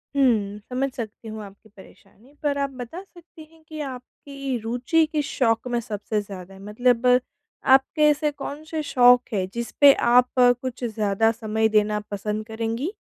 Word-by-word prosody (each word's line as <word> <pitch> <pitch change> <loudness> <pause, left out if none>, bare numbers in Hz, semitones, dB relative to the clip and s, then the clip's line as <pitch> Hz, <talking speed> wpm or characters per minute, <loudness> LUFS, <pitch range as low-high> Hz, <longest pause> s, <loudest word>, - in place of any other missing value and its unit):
हुँ, 215 -7 +2
समझ 260 +2 -1
सकती 225 -1 -7
हूँ 220 -1 -7
आपकी 200 +2 -15
परेशानी, 205 +5 -19
पर 285 -1 0
आप 280 0 -1
बता 320 +10 -7
सकती 345 -4 -16
हैं 325 -1 -22
कि 310 -1 -8
आपकी 265 +1 -6
रुचि 245 +8 +1
किस 300 -2 -1
शौक 230 -1 0
में 240 - +1
सबसे 210 -1 -3
ज़्यादा 195 -2 -10
है? 190 - -14
मतलब 245 +4 +1 0.7
आपके 270 +4 +2
ऐसे 295 0 +1
कौन 290 +1 -7
से 320 -1 -2
शौक 245 -3 +5
हैं 190 -3 0
जिस 235 0 -4
पे 280 -1 +9 0.2
आप 250 0 +6
कुछ 250 0 +2
ज़्यादा 220 -1 +1
समय 220 -1 0
देना 210 0 +2
पसंद 210 +2 -3
करेंगी? 230 - -3
240 Hz, 165 wpm, -23 LUFS, 215-275 Hz, 0.7 s, पे